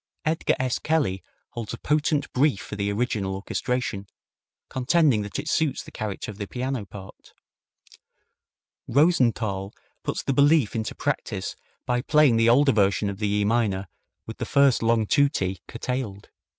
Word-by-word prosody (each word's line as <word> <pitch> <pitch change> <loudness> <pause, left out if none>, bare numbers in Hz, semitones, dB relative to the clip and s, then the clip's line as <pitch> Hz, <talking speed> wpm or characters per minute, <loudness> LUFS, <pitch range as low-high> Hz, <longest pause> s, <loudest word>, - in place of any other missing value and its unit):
Edgar 160 +2 +1
S. 130 -1 -1
Kelly 145 - 0 0.3
holds 115 -3 -5
a - - -13
potent 150 -1 0
brief 135 -5 +2
for 105 - -7
the 100 0 -1
original 100 -3 -1
orchestration, 100 0 -3 0.6
contending 135 -2 +2
that 100 -1 -5
it - - -5
suits 150 -4 0
the - - -13
character 110 -1 -5
of 105 - -13
the 100 - -4
piano 125 -3 -3
part. 95 0 -12 1.5
Rosenthal 115 - +2 0.3
puts - - -3
this 135 - 0
belief 145 -4 +4
into 110 -1 -3
practice - - -3 0.3
by 125 0 0
playing 145 -3 +4
the 115 0 +4
older 135 +4 +5
version 100 -2 +2
of 100 - -9
the 105 - 0
E 105 0 +1
minor 105 -4 +1 0.4
with - - -9
the - - -2
first 140 -3 +3
long 115 -1 +2
tutti 105 - +1
curtailed. 115 -4 -4
115 Hz, 150 wpm, -25 LUFS, 100-140 Hz, 1.5 s, older